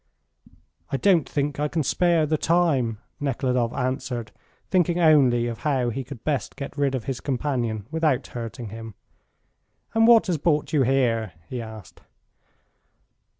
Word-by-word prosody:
"I -, -, +1 dB
don't 175 Hz, -2 st, +3 dB
think 145 Hz, 0 st, -2 dB
I 150 Hz, -, +1 dB
can 160 Hz, +1 st, -1 dB
spare 170 Hz, +2 st, +2 dB
the 155 Hz, +1 st, +1 dB
time," 150 Hz, -9 st, +1 dB, 0.2 s
Nekhludoff 125 Hz, -4 st, 0 dB
answered, 130 Hz, -3 st, -3 dB, 0.4 s
thinking 175 Hz, -2 st, +2 dB
only 135 Hz, -8 st, +5 dB
of 120 Hz, -1 st, -4 dB
how 130 Hz, -5 st, 0 dB
he 135 Hz, +4 st, -4 dB
could 130 Hz, -3 st, -10 dB
best 145 Hz, -3 st, -2 dB
get 140 Hz, -1 st, -7 dB
rid 140 Hz, -2 st, +1 dB
of 125 Hz, -, -3 dB
his 135 Hz, -2 st, -4 dB
companion 125 Hz, -6 st, -2 dB
without 160 Hz, -5 st, +1 dB
hurting 115 Hz, -1 st, -6 dB
him. 110 Hz, -1 st, -9 dB, 1.0 s
"And 225 Hz, 0 st, +4 dB
what 235 Hz, -1 st, +7 dB
has 175 Hz, -6 st, -1 dB
brought 150 Hz, 0 st, 0 dB
you 150 Hz, -, +4 dB
here?" 120 Hz, -6 st, +1 dB, 0.2 s
he 125 Hz, -2 st, -4 dB
asked. 110 Hz, -6 st, -11 dB
135 Hz, 150 wpm, -24 LUFS, 120-155 Hz, 1.0 s, what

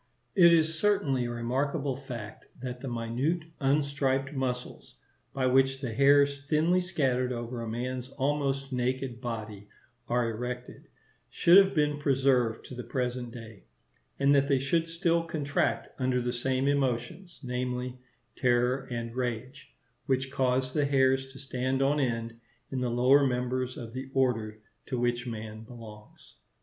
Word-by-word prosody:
It 170 Hz, -2 st, +7 dB
is 160 Hz, -1 st, +3 dB
certainly 140 Hz, -12 st, +2 dB
a -, -, -3 dB
remarkable 135 Hz, +4 st, -1 dB
fact, 120 Hz, -6 st, -8 dB
that 125 Hz, 0 st, -6 dB
the 135 Hz, -, -5 dB
minute 120 Hz, +8 st, -1 dB, 0.2 s
unstriped 140 Hz, 0 st, +1 dB
muscles, 125 Hz, -2 st, -4 dB, 0.4 s
by 135 Hz, -1 st, -1 dB
which 135 Hz, +1 st, +3 dB
the 130 Hz, -4 st, -4 dB
hairs 140 Hz, +2 st, +4 dB
thinly 165 Hz, +4 st, +3 dB
scattered 130 Hz, -8 st, 0 dB
over 120 Hz, -1 st, -4 dB
man's 125 Hz, +2 st, -4 dB
almost 135 Hz, 0 st, -1 dB
naked 125 Hz, -1 st, -2 dB
body 110 Hz, -4 st, -5 dB, 0.4 s
are 120 Hz, -1 st, +1 dB
erected, 125 Hz, +2 st, -5 dB, 0.4 s
should 170 Hz, -, +5 dB
have 195 Hz, -1 st, +5 dB
been 150 Hz, -1 st, +1 dB
preserved 130 Hz, -5 st, +2 dB
to -, -, -9 dB
the 125 Hz, 0 st, -6 dB
present 125 Hz, 0 st, -2 dB
day; 115 Hz, -, -11 dB, 0.5 s
and 140 Hz, +1 st, +4 dB
that 140 Hz, -1 st, +4 dB
they 140 Hz, -2 st, +3 dB
should 165 Hz, +5 st, 0 dB
still 165 Hz, 0 st, +1 dB
contract 145 Hz, -4 st, -1 dB
under 130 Hz, -1 st, +1 dB
the 125 Hz, 0 st, -2 dB
same 130 Hz, +2 st, 0 dB
emotions, 140 Hz, +6 st, -1 dB
namely, 125 Hz, 0 st, -3 dB, 0.4 s
terror 125 Hz, +1 st, +1 dB
and 115 Hz, -1 st, -4 dB
rage, 125 Hz, +2 st, -4 dB, 0.4 s
which 130 Hz, 0 st, 0 dB
cause 130 Hz, -1 st, +1 dB
the 150 Hz, -2 st, +2 dB
hairs 135 Hz, -1 st, +2 dB
to 135 Hz, -, -13 dB
stand 130 Hz, 0 st, -1 dB
on 145 Hz, +2 st, +2 dB
end 115 Hz, -3 st, -2 dB, 0.3 s
in 130 Hz, -2 st, -2 dB
the 125 Hz, -, 0 dB
lower 125 Hz, +4 st, +5 dB
members 125 Hz, 0 st, -1 dB
of 115 Hz, -2 st, -8 dB
the 130 Hz, +1 st, -6 dB
Order 110 Hz, -5 st, 0 dB, 0.2 s
to 130 Hz, -, -2 dB
which 120 Hz, +1 st, 0 dB
man 110 Hz, -1 st, -6 dB
belongs. 110 Hz, -3 st, -13 dB
130 Hz, 145 wpm, -29 LUFS, 120-140 Hz, 0.5 s, It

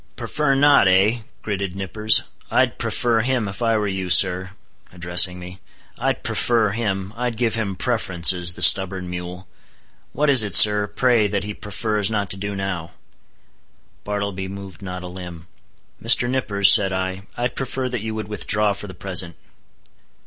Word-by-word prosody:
"Prefer 150 Hz, -2 st, -2 dB
not, 140 Hz, -6 st, +4 dB
eh?" 95 Hz, +6 st, +2 dB, 0.2 s
gritted 100 Hz, -3 st, -4 dB
Nippers—"I'd 105 Hz, +3 st, +1 dB
prefer 120 Hz, -2 st, -1 dB
him, 125 Hz, -2 st, -1 dB
if 100 Hz, +4 st, -8 dB
I 115 Hz, -1 st, +1 dB
were 105 Hz, -1 st, -2 dB
you, 95 Hz, -2 st, -4 dB
sir," 90 Hz, +1 st, +3 dB, 0.4 s
addressing 90 Hz, 0 st, +3 dB
me—"I'd 90 Hz, -1 st, -7 dB
prefer 115 Hz, -4 st, 0 dB
him; 100 Hz, -3 st, -4 dB
I'd 120 Hz, -1 st, -4 dB
give 120 Hz, -3 st, -1 dB
him 110 Hz, -4 st, -3 dB
preferences, 90 Hz, -7 st, 0 dB
the 90 Hz, -, +3 dB
stubborn 95 Hz, +1 st, +5 dB
mule! 90 Hz, +1 st, -8 dB, 0.6 s
What 150 Hz, -, -1 dB
is 130 Hz, -4 st, +7 dB
it, 100 Hz, -5 st, +1 dB
sir, 105 Hz, -1 st, +6 dB
pray, 120 Hz, -2 st, +1 dB
that 100 Hz, -1 st, -3 dB
he 105 Hz, +1 st, -6 dB
prefers 105 Hz, 0 st, -3 dB
not 105 Hz, -2 st, -3 dB
to 100 Hz, -, -3 dB
do 100 Hz, +1 st, -5 dB
now?" 95 Hz, -4 st, -5 dB, 1.1 s
Bartleby 100 Hz, -2 st, -4 dB
moved 95 Hz, -3 st, -10 dB
not 90 Hz, -1 st, -7 dB
a -, -, -7 dB
limb. 90 Hz, -2 st, -10 dB, 0.6 s
"Mr. 120 Hz, +1 st, +5 dB
Nippers," 100 Hz, -7 st, +3 dB
said 95 Hz, -1 st, +4 dB
I, 95 Hz, 0 st, -4 dB, 0.2 s
"I'd 120 Hz, +1 st, -3 dB
prefer 130 Hz, -1 st, -4 dB
that 125 Hz, -3 st, -4 dB
you 110 Hz, 0 st, -5 dB
would 110 Hz, -2 st, -6 dB
withdraw 105 Hz, 0 st, 0 dB
for 105 Hz, -, -9 dB
the 95 Hz, -, -11 dB
present." 90 Hz, -3 st, -2 dB
100 Hz, 155 wpm, -20 LUFS, 95-110 Hz, 1.1 s, is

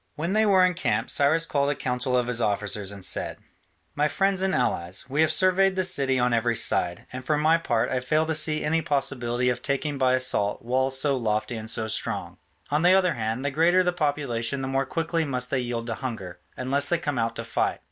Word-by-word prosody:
When 170 Hz, +5 st, -2 dB
they 215 Hz, 0 st, +3 dB
were 190 Hz, -2 st, +5 dB
encamped, 165 Hz, -11 st, -1 dB
Cyrus 160 Hz, +4 st, +2 dB
called 140 Hz, -2 st, 0 dB
a 145 Hz, -, 0 dB
council 125 Hz, 0 st, -1 dB
of 125 Hz, -, +1 dB
his 120 Hz, -1 st, 0 dB
officers 105 Hz, -1 st, -1 dB
and 100 Hz, -2 st, -7 dB
said, -, -, -2 dB, 0.6 s
"My 150 Hz, +1 st, +1 dB
friends 195 Hz, +3 st, 0 dB
and 190 Hz, 0 st, 0 dB
allies, 85 Hz, +2 st, -1 dB
we 140 Hz, +4 st, 0 dB
have 160 Hz, -, +3 dB
surveyed 190 Hz, 0 st, +3 dB
the 185 Hz, -, 0 dB
city 135 Hz, -7 st, +1 dB
on 125 Hz, -1 st, +1 dB
every 115 Hz, 0 st, +1 dB
side, 90 Hz, -5 st, 0 dB
and 130 Hz, 0 st, -6 dB
for 150 Hz, +3 st, 0 dB
my 160 Hz, +2 st, +3 dB
part 120 Hz, -8 st, -1 dB
I 130 Hz, -, 0 dB
fail 155 Hz, +5 st, +1 dB
to 160 Hz, -, -1 dB
see 155 Hz, 0 st, +1 dB
any 165 Hz, +2 st, +1 dB
possibility 125 Hz, -5 st, -1 dB
of 125 Hz, 0 st, -2 dB
taking 140 Hz, +1 st, -2 dB
by 130 Hz, -1 st, +3 dB
assault 130 Hz, -5 st, +1 dB
walls 130 Hz, +2 st, +1 dB
so 140 Hz, 0 st, +1 dB
lofty 110 Hz, -1 st, -2 dB
and 110 Hz, 0 st, -2 dB
so 110 Hz, -1 st, +2 dB
strong: 110 Hz, -, -3 dB, 0.3 s
on 150 Hz, +1 st, +2 dB
the 180 Hz, +2 st, +5 dB
other 185 Hz, -3 st, +3 dB
hand, 115 Hz, +1 st, -3 dB
the 140 Hz, -, 0 dB
greater 170 Hz, +5 st, +3 dB
the 180 Hz, 0 st, 0 dB
population 140 Hz, -5 st, -2 dB
the -, -, -3 dB
more 135 Hz, 0 st, -1 dB
quickly 165 Hz, +1 st, -1 dB
must 125 Hz, -4 st, -2 dB
they 130 Hz, -, +1 dB
yield 120 Hz, -2 st, -3 dB
to 115 Hz, -, -3 dB
hunger, 110 Hz, -8 st, -6 dB, 0.2 s
unless 140 Hz, +3 st, +1 dB
they 175 Hz, -, +2 dB
come 145 Hz, -6 st, -3 dB
out 115 Hz, 0 st, -1 dB
to 115 Hz, -, -5 dB
fight. 115 Hz, -, -1 dB
135 Hz, 225 wpm, -25 LUFS, 120-160 Hz, 0.6 s, were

